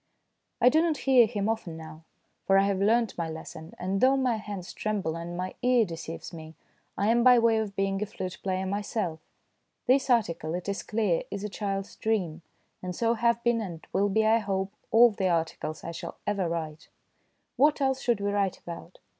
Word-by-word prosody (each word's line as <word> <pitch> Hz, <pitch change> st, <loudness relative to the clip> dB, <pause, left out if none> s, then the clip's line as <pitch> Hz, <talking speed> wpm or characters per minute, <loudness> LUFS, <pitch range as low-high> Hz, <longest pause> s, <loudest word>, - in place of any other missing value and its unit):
I 250 Hz, -, +6 dB
do 315 Hz, +4 st, +4 dB
not 330 Hz, -3 st, +1 dB
hear 255 Hz, -4 st, +6 dB
him 210 Hz, -2 st, -2 dB
often 220 Hz, -7 st, -3 dB
now, 160 Hz, 0 st, -11 dB, 0.4 s
for 195 Hz, -, +5 dB
I 195 Hz, -, +5 dB
have 200 Hz, -1 st, 0 dB
learnt 225 Hz, +2 st, +2 dB
my 165 Hz, -1 st, -1 dB
lesson, 160 Hz, 0 st, -9 dB
and 190 Hz, +2 st, -2 dB
though 265 Hz, +1 st, +5 dB
my 255 Hz, -4 st, +1 dB
hands 205 Hz, -4 st, -7 dB
tremble 200 Hz, -7 st, -2 dB
and 170 Hz, +1 st, -6 dB
my 185 Hz, +1 st, -3 dB
ear 250 Hz, -2 st, +4 dB
deceives 165 Hz, -1 st, -7 dB
me, 160 Hz, -1 st, -9 dB, 0.4 s
I 205 Hz, -, +1 dB
am 235 Hz, +1 st, +4 dB
by 250 Hz, 0 st, +7 dB
way 230 Hz, -1 st, +4 dB
of 210 Hz, -3 st, -4 dB
being 195 Hz, 0 st, 0 dB
a 210 Hz, -, -1 dB
flute 185 Hz, -3 st, -6 dB
player 190 Hz, -1 st, -1 dB
myself. 200 Hz, -3 st, -2 dB, 0.7 s
This 265 Hz, +2 st, +3 dB
article, 170 Hz, -9 st, +1 dB
it 180 Hz, +1 st, -5 dB
is 200 Hz, 0 st, -2 dB
clear, 210 Hz, -6 st, 0 dB
is 200 Hz, 0 st, -5 dB
a 210 Hz, -, -3 dB
child's 195 Hz, 0 st, -4 dB
dream, 185 Hz, -7 st, -1 dB, 0.4 s
and 180 Hz, -1 st, -5 dB
so 230 Hz, 0 st, +2 dB
have 235 Hz, 0 st, +1 dB
been, 235 Hz, -1 st, +2 dB
and 170 Hz, -6 st, -7 dB
will 205 Hz, +1 st, +2 dB
be, 220 Hz, +2 st, +2 dB
I 225 Hz, +1 st, +4 dB
hope, 195 Hz, -2 st, -2 dB, 0.2 s
all 235 Hz, +1 st, +7 dB
the 190 Hz, -2 st, -1 dB
articles 160 Hz, -2 st, -2 dB
I 170 Hz, -, -5 dB
shall 170 Hz, -, -7 dB
ever 200 Hz, -4 st, 0 dB
write, 160 Hz, -2 st, -5 dB, 0.7 s
What 295 Hz, +2 st, +4 dB
else 265 Hz, -1 st, +1 dB
should 235 Hz, -4 st, +1 dB
we 200 Hz, 0 st, 0 dB
write 200 Hz, -2 st, 0 dB
about? 170 Hz, +1 st, -9 dB
200 Hz, 200 wpm, -28 LUFS, 175-230 Hz, 0.7 s, by